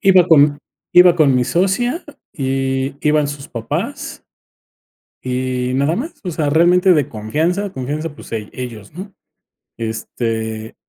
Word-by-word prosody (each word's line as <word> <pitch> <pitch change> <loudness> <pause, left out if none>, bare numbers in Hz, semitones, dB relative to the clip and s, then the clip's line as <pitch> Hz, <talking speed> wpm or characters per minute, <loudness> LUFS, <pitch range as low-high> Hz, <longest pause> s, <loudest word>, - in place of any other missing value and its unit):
Iba 185 -2 +5
con 145 -3 +5 0.3
iba 180 -1 +7
con 145 -6 +4
mi 125 - +2
socia 195 - 0 0.3
y 135 -1 -1
iban 150 -1 +2
sus 145 -1 -7
papás 115 -1 -4 1.0
y 125 0 -2
nada 140 +4 +1
más, 310 +8 -4
o 180 - -3
sea, 155 -2 -1
realmente 180 +4 +5
de 145 -4 +2
confianza, 160 - -1
confianza, 150 +3 -4
pues, - - -13
e 110 -2 -4
ellos, 115 -4 -8
¿no?, 190 +4 -8 0.7
este, 110 -1 -4
145 Hz, 130 wpm, -18 LUFS, 125-175 Hz, 1.0 s, iba